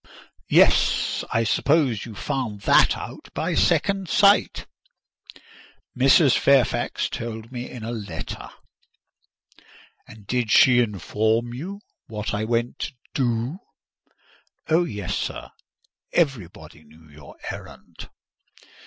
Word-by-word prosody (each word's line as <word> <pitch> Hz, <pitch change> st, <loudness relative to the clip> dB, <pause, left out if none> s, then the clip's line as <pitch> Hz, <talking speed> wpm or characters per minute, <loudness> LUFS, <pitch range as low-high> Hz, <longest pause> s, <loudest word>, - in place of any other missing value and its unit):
"Yes; -, -, +3 dB
I 115 Hz, -, +1 dB
suppose 130 Hz, 0 st, +1 dB
you 110 Hz, -, -10 dB
found 125 Hz, -5 st, -4 dB
that -, -, +4 dB
out -, -, -9 dB
by -, -, -1 dB
second 195 Hz, -3 st, +1 dB
sight." 200 Hz, 0 st, +3 dB, 1.3 s
"Mrs. 135 Hz, +2 st, +5 dB
Fairfax 140 Hz, -3 st, +2 dB
told 115 Hz, 0 st, -7 dB
me 125 Hz, -1 st, -6 dB
in 120 Hz, -, -9 dB
a 115 Hz, -, -4 dB
letter." 100 Hz, -9 st, -7 dB, 1.6 s
"And 110 Hz, -2 st, -14 dB
did 120 Hz, 0 st, -1 dB
she 125 Hz, +3 st, +6 dB
inform 110 Hz, +2 st, 0 dB
you 190 Hz, +11 st, -7 dB, 0.3 s
what 105 Hz, -1 st, -5 dB
I 105 Hz, +1 st, -1 dB
went 120 Hz, +1 st, -1 dB
to 150 Hz, -, -4 dB, 0.2 s
do?" 125 Hz, +5 st, -1 dB, 1.1 s
"Oh, 165 Hz, +2 st, +3 dB
yes, 105 Hz, -, -4 dB
sir! -, -, -5 dB, 0.6 s
Everybody 95 Hz, -, -2 dB
knew 80 Hz, +1 st, -20 dB
your 75 Hz, -2 st, -15 dB, 0.2 s
errand." -, -, -11 dB
120 Hz, 110 wpm, -23 LUFS, 105-135 Hz, 1.6 s, she